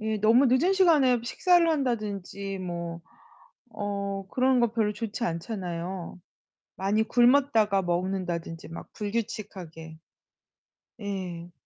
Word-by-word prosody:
예 220 Hz, 0 st, -1 dB
너무 230 Hz, +6 st, +5 dB
늦은 260 Hz, +10 st, +3 dB
시간에 305 Hz, -10 st, +4 dB
식사를 345 Hz, +7 st, +3 dB
한다든지 205 Hz, -, -2 dB
뭐 170 Hz, -2 st, -5 dB, 0.7 s
어 200 Hz, -1 st, -3 dB
그런 255 Hz, 0 st, +3 dB
거 235 Hz, -2 st, +2 dB
별로 220 Hz, -3 st, +1 dB
좋지 215 Hz, +2 st, -5 dB
않잖아요. 180 Hz, -2 st, -4 dB, 0.6 s
많이 200 Hz, +3 st, +1 dB
굶었다가 240 Hz, -4 st, +3 dB
먹는다든지 175 Hz, -2 st, -3 dB
막 165 Hz, -, -8 dB
불규칙하게. 195 Hz, -7 st, -5 dB, 1.0 s
예. 180 Hz, -4 st, -5 dB
205 Hz, 235 characters per minute, -27 LUFS, 180-240 Hz, 1.0 s, 너무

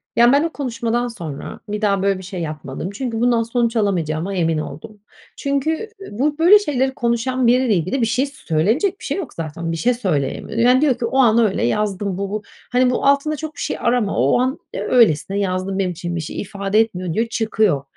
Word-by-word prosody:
Ya, 240 Hz, +1 st, +6 dB
ben 285 Hz, +3 st, +4 dB
o 330 Hz, -, 0 dB
konuşmadan 240 Hz, -3 st, -2 dB
sonra, 170 Hz, -, -7 dB
bir 210 Hz, +1 st, -3 dB
daha 200 Hz, -2 st, +2 dB
böyle 195 Hz, -1 st, +2 dB
bir 190 Hz, -, -9 dB
şey 185 Hz, -1 st, -6 dB
yapmadım. 155 Hz, 0 st, -5 dB
Çünkü 230 Hz, +1 st, -4 dB
bundan 240 Hz, -1 st, +3 dB
sonuç 235 Hz, 0 st, 0 dB
alamayacağıma 180 Hz, -4 st, 0 dB
emin 165 Hz, -3 st, +1 dB
oldum. 160 Hz, +7 st, -7 dB, 0.4 s
Çünkü, 280 Hz, +1 st, -1 dB, 0.3 s
eee, 395 Hz, -, -9 dB
bu, 290 Hz, +8 st, 0 dB
böyle, 360 Hz, +6 st, +7 dB
şeyleri 265 Hz, -8 st, 0 dB
konuşan 240 Hz, +1 st, 0 dB
biriyle 250 Hz, -1 st, +3 dB
ilgili 185 Hz, -, -1 dB
bir 230 Hz, -, +3 dB
şey, 250 Hz, +5 st, +1 dB
söylenecek 270 Hz, -, 0 dB
bir -, -, -10 dB
şey -, -, -2 dB
yok 370 Hz, -8 st, -5 dB
zaten 165 Hz, +1 st, -4 dB
bir 165 Hz, -, -2 dB
şey 245 Hz, +8 st, +2 dB
söyleyemiyor. 185 Hz, -, -2 dB
Yani, 250 Hz, +3 st, +5 dB
diyor 285 Hz, -5 st, +3 dB
ki 240 Hz, -, -2 dB
o 260 Hz, -, -1 dB
an 235 Hz, -4 st, +5 dB
öyle 215 Hz, -4 st, +2 dB
yazdım 200 Hz, -, -1 dB
bu 200 Hz, 0 st, -3 dB
bu 210 Hz, +1 st, -3 dB, 0.3 s
Hani, 250 Hz, 0 st, +3 dB
bu 250 Hz, -, -1 dB
altında 280 Hz, +2 st, +3 dB
çok 310 Hz, 0 st, -7 dB
bir -, -, -11 dB
şey -, -, -2 dB
arama, 235 Hz, -4 st, +1 dB
o 135 Hz, -, +3 dB
an, 260 Hz, +2 st, 0 dB, 0.2 s
eee, -, -, -3 dB
öylesine 200 Hz, -4 st, +3 dB
yazdım 190 Hz, 0 st, -1 dB
benim 185 Hz, -2 st, 0 dB
için 175 Hz, 0 st, -5 dB
bir 170 Hz, -, -2 dB
şey 155 Hz, -, -5 dB
ifade 200 Hz, +1 st, -1 dB
etmiyor 185 Hz, -6 st, 0 dB
diyor 225 Hz, +6 st, 0 dB
çıkıyor. 220 Hz, -, +1 dB
225 Hz, 215 wpm, -20 LUFS, 185-250 Hz, 0.4 s, böyle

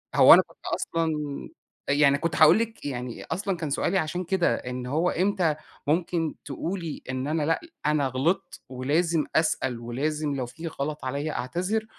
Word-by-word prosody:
هو -, -, +10 dB
أنا -, -, +8 dB
كنت -, -, -21 dB
أصلًا 165 Hz, -1 st, -1 dB, 0.8 s
أ -, -, +4 dB
يعني 140 Hz, -1 st, +5 dB
كنت 160 Hz, +1 st, -2 dB
هاقول 155 Hz, +7 st, +7 dB
لِك 225 Hz, -7 st, -4 dB
يعني 125 Hz, -3 st, -4 dB
أصلًا 190 Hz, +2 st, -2 dB
كان 160 Hz, -3 st, -3 dB
سؤالي 170 Hz, +6 st, +1 dB
عشان 175 Hz, +1 st, -1 dB
كده، 180 Hz, 0 st, +2 dB
إن 125 Hz, 0 st, -5 dB
هو 160 Hz, +7 st, +1 dB
إمتى 185 Hz, -3 st, +1 dB, 0.3 s
ممكن 165 Hz, 0 st, 0 dB
تقولي 165 Hz, +3 st, -4 dB
إن 130 Hz, +1 st, -2 dB
أنا 155 Hz, 0 st, 0 dB
لأ 165 Hz, +2 st, +1 dB, 0.3 s
أنا 150 Hz, -2 st, +2 dB
غلطت 135 Hz, +8 st, -1 dB
ولازم 150 Hz, +6 st, +1 dB
أسأل، 145 Hz, -6 st, +1 dB
ولازم 145 Hz, +5 st, -2 dB
لو 130 Hz, -2 st, -2 dB
في 160 Hz, +8 st, -8 dB
غلط 150 Hz, -1 st, -4 dB
عليَّ 140 Hz, +4 st, -2 dB
أعتذر؟ 185 Hz, -, -2 dB
155 Hz, 165 wpm, -26 LUFS, 140-170 Hz, 0.8 s, هو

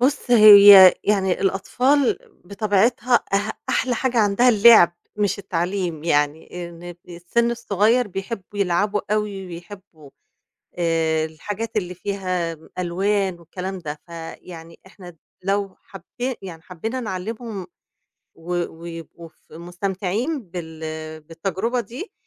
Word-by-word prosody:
بُصّ، 260 Hz, 0 st, 0 dB
هي 205 Hz, -4 st, +10 dB
يعني 190 Hz, -3 st, +1 dB
الأطفال 250 Hz, +8 st, +1 dB, 0.3 s
بطبيعتها 215 Hz, +5 st, +1 dB
أ 205 Hz, -1 st, 0 dB, 0.2 s
أحلى 250 Hz, -1 st, 0 dB
حاجة 250 Hz, -1 st, -1 dB
عندها 210 Hz, +4 st, +3 dB
اللعب 215 Hz, -6 st, +7 dB, 0.2 s
مش 205 Hz, -1 st, 0 dB
التعليم، 175 Hz, -3 st, -3 dB
يعني 160 Hz, +3 st, -1 dB
إن 175 Hz, +1 st, -10 dB
السِّن 175 Hz, +8 st, -1 dB
الصغيّر 230 Hz, 0 st, +1 dB
بيحبّوا 195 Hz, +1 st, -7 dB
يلعبوا 200 Hz, +3 st, +1 dB
أوي، 205 Hz, -3 st, -3 dB
ويحبّوا 175 Hz, -4 st, -12 dB, 0.7 s
آآ 160 Hz, -2 st, +1 dB
الحاجات 205 Hz, +8 st, -6 dB
اللي 180 Hz, -3 st, -2 dB
فيها 185 Hz, -3 st, -3 dB, 0.2 s
ألوان 190 Hz, +1 st, -1 dB
والكلام 185 Hz, +3 st, -6 dB
ده، 150 Hz, -3 st, -7 dB
فيعني 165 Hz, 0 st, -10 dB
إحنا 180 Hz, -3 st, -14 dB, 0.3 s
لو 195 Hz, 0 st, -1 dB
حبي 245 Hz, +4 st, -6 dB
يعني 165 Hz, -4 st, -9 dB
حبّينا 220 Hz, +9 st, -5 dB
نعلِّمهم، 215 Hz, -1 st, -6 dB, 0.7 s
و 170 Hz, +2 st, -6 dB, 0.2 s
ويبقوا 165 Hz, 0 st, -10 dB
ف -, -, -29 dB
مستمتعين 190 Hz, -, -3 dB
بال 160 Hz, -2 st, -7 dB
بالتجربة 195 Hz, +9 st, -3 dB
دي، 245 Hz, -, -9 dB
190 Hz, 110 wpm, -22 LUFS, 170-215 Hz, 0.7 s, هي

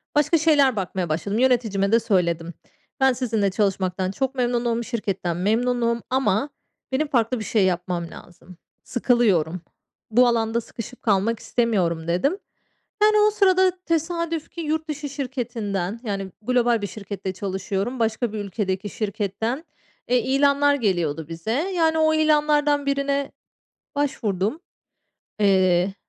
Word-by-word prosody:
başka 295 Hz, +3 st, +4 dB
şeyler 295 Hz, -5 st, +4 dB
bakmaya 185 Hz, -3 st, -3 dB
başladım. 200 Hz, +8 st, -1 dB
Yöneticime 225 Hz, -6 st, +2 dB
de 230 Hz, -, +5 dB
söyledim. 170 Hz, -6 st, 0 dB, 0.5 s
Ben 265 Hz, -1 st, +4 dB
sizinle 225 Hz, -6 st, 0 dB
çalışmaktan 190 Hz, -2 st, 0 dB
çok 265 Hz, +6 st, -2 dB
memnunum, 240 Hz, -2 st, 0 dB
şirketten 195 Hz, -7 st, -3 dB
memnunum 235 Hz, +4 st, +1 dB
ama 260 Hz, 0 st, +1 dB, 0.4 s
benim 285 Hz, +4 st, 0 dB
farklı 245 Hz, -2 st, +1 dB
bir -, -, -4 dB
şey 210 Hz, -2 st, +2 dB
yapmam 175 Hz, -1 st, -1 dB
lazım. 180 Hz, 0 st, -14 dB, 0.3 s
Sıkılıyorum, 200 Hz, -, +1 dB, 0.5 s
bu 245 Hz, +3 st, +5 dB
alanda 230 Hz, -1 st, +1 dB
sıkışıp 230 Hz, +2 st, -9 dB
kalmak 215 Hz, +2 st, +1 dB
istemiyorum, 180 Hz, -9 st, 0 dB
dedim. 275 Hz, -, +1 dB, 0.7 s
Yani, 425 Hz, 0 st, +5 dB
o -, -, +2 dB
sırada 375 Hz, -3 st, +4 dB
tesadüf 335 Hz, 0 st, -2 dB
ki 340 Hz, -, -7 dB
yurt 315 Hz, 0 st, -2 dB
dışı 295 Hz, -1 st, -4 dB
şirketinden, 230 Hz, -7 st, -3 dB
yani, 195 Hz, -3 st, -4 dB
global 240 Hz, -1 st, +2 dB
bir -, -, -1 dB
şirkette 200 Hz, -1 st, -6 dB
çalışıyorum, 195 Hz, +5 st, -3 dB
başka 225 Hz, 0 st, 0 dB
bir 215 Hz, -, -4 dB
ülkedeki 195 Hz, -1 st, -3 dB
şirketten, 215 Hz, -, -3 dB, 0.4 s
eee, 250 Hz, -, +4 dB
ilanlar 280 Hz, +2 st, +3 dB
geliyordu 170 Hz, -, -1 dB
bize. 165 Hz, +5 st, -5 dB
Yani, 325 Hz, +2 st, +1 dB
o 315 Hz, 0 st, +3 dB
ilanlardan 295 Hz, -2 st, +2 dB
birine 280 Hz, 0 st, 0 dB, 0.6 s
başvurdum. 225 Hz, -, -1 dB, 0.8 s
Eee, 190 Hz, -2 st, +3 dB
230 Hz, 125 wpm, -23 LUFS, 195-275 Hz, 0.8 s, de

